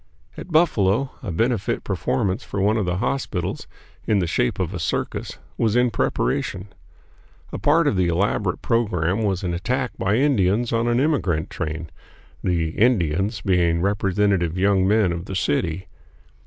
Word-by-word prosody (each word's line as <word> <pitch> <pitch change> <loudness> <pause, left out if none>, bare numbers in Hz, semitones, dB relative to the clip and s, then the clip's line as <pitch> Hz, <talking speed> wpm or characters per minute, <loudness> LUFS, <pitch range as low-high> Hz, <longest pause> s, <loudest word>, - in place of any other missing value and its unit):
At 185 - -9
Buffalo, 130 - +2
a 100 - -4
benefit 115 +4 0
performance 105 +1 -1
for 100 - -5
one 105 +3 +2
of 105 -5 -1
the 90 0 0
hospitals, 115 -5 -2 0.4
in 105 - +3
the 95 - +1
shape 60 -6 0
of - - -2
a - - -4
circus, - - -3 0.2
was 110 -1 +2
in 125 -1 +3
preparation. 95 -1 -1 0.8
A - - -5
part - - +3
of - - +2
the 90 -2 +2
elaborate 90 +2 0
program 105 -5 0
was 100 -3 -1
an 90 -2 -1
attack 125 +8 -1
by 100 +2 +1
Indians 120 -4 +2
on 115 +1 +1
an 120 0 +2
emigrant 125 - 0
train, 80 +1 -4 0.5
the 85 -3 0
"Indians" 95 -1 +1
being 85 -4 +2
representative 95 -2 +1
young 95 0 +3
men 105 -3 +3
of 85 +1 -4
the 95 - -6
city. 85 +2 -1
100 Hz, 155 wpm, -22 LUFS, 90-115 Hz, 0.8 s, in